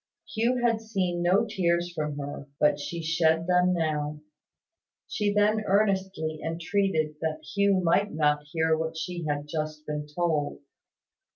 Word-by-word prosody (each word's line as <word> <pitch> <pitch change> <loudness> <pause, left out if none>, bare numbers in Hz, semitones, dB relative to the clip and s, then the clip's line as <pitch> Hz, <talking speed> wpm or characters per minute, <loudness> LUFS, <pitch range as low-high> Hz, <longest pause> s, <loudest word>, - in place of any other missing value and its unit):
Hugh 235 +3 +1
had 230 -2 +2
seen 190 -6 -1
no 185 +6 +3
tears 175 -4 0
from 150 -3 -3
her; 140 0 -6
but 150 - +3
she 165 +3 -5
shed 160 0 +2
them 180 0 +3
now. 150 -3 -1 0.9
She 205 -1 0
then 210 +1 +3
earnestly 190 -6 +1
entreated 165 -2 0
that 160 -1 -2
Hugh 200 -2 +3
might 195 +5 +2
not 150 -1 +2
hear 160 -1 +2
what 160 0 -3
she 170 0 -4
had 145 0 -2
just 155 0 -4
been 150 0 -4
told. 150 -1 -1
165 Hz, 145 wpm, -27 LUFS, 155-190 Hz, 0.9 s, no